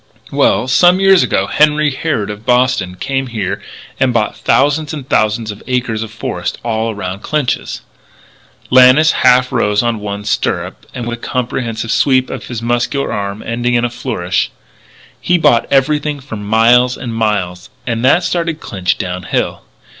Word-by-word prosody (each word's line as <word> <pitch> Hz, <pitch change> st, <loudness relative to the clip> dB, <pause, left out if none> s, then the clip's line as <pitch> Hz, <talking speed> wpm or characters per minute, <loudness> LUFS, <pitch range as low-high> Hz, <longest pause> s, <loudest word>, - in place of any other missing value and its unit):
Well, 125 Hz, -, +2 dB
some 175 Hz, +8 st, +4 dB
years 195 Hz, -1 st, +5 dB
ago 95 Hz, -, +1 dB
Henry 150 Hz, +5 st, +2 dB
Harrod, 130 Hz, -7 st, -2 dB
of 105 Hz, +1 st, -9 dB
Boston, 125 Hz, -7 st, +1 dB
came 135 Hz, +6 st, -2 dB
here 110 Hz, -6 st, -3 dB, 0.4 s
and 130 Hz, -1 st, +2 dB
bought 115 Hz, -3 st, 0 dB
thousands 145 Hz, +3 st, +1 dB
and 140 Hz, -4 st, -8 dB
thousands 110 Hz, -1 st, 0 dB
of 105 Hz, -, -11 dB
acres 125 Hz, -4 st, -1 dB
of 110 Hz, -, -5 dB
forest 110 Hz, 0 st, -4 dB
all 115 Hz, -1 st, -1 dB
around 100 Hz, -2 st, -5 dB
Clinch's 150 Hz, -5 st, -2 dB, 0.4 s
" -, -, -29 dB
Lannis 130 Hz, +5 st, +6 dB
half 125 Hz, +1 st, +3 dB
rose 105 Hz, -4 st, +1 dB
on 120 Hz, -2 st, -1 dB
one 105 Hz, 0 st, -5 dB
stirrup 105 Hz, -, -2 dB
and, 120 Hz, -, -4 dB
with 120 Hz, 0 st, -4 dB
a -, -, -27 dB
comprehensive 115 Hz, -2 st, -3 dB
sweep 130 Hz, +2 st, +2 dB
of -, -, -7 dB
his 115 Hz, -2 st, -5 dB
muscular 120 Hz, +4 st, -1 dB
arm, 100 Hz, +1 st, -4 dB
ending 120 Hz, +1 st, -1 dB
in 120 Hz, 0 st, +2 dB
a 120 Hz, -, -3 dB
flourish: 95 Hz, -9 st, -2 dB, 0.4 s
" -, -, -28 dB, 0.3 s
He 180 Hz, -, +2 dB
bought 120 Hz, -8 st, +3 dB
everything 145 Hz, +2 st, +1 dB
for 135 Hz, -4 st, -8 dB
miles 115 Hz, +4 st, +3 dB
and 120 Hz, -3 st, -5 dB
miles. 100 Hz, -5 st, -2 dB, 0.2 s
And 115 Hz, -1 st, -2 dB
that 150 Hz, +7 st, +4 dB
started 170 Hz, -2 st, -1 dB
Clinch 95 Hz, -, -2 dB
down 90 Hz, 0 st, -4 dB
hill. 90 Hz, -, -2 dB
120 Hz, 170 wpm, -15 LUFS, 110-135 Hz, 0.4 s, Lannis